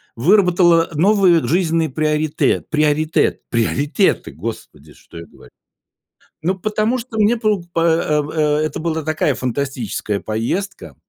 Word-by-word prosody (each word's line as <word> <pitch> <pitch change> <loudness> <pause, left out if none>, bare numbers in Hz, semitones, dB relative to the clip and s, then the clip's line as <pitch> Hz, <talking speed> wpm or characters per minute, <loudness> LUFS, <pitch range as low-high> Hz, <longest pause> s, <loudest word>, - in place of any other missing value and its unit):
выработало 175 - +3
новые 180 - +3
жизненные 165 +2 +1
приоритет 155 +1 0
приоритет 155 0 +1
приоритеты, 140 - 0
Господи, 80 -6 -8
что - - -16
я 85 - -9
говорю. - - -19 0.9
Ну, 185 +3 0
потому 215 +5 0
что 230 -1 -8
мне 215 +3 +3
по 215 -4 0
по 165 - 0
э, 160 -2 +2
а, 150 -1 +1
это 155 - -3
была 160 -1 -2
такая 155 -2 0
фантастическая 125 -5 -3
поездка, 115 - -4
155 Hz, 125 wpm, -18 LUFS, 140-185 Hz, 0.9 s, выработало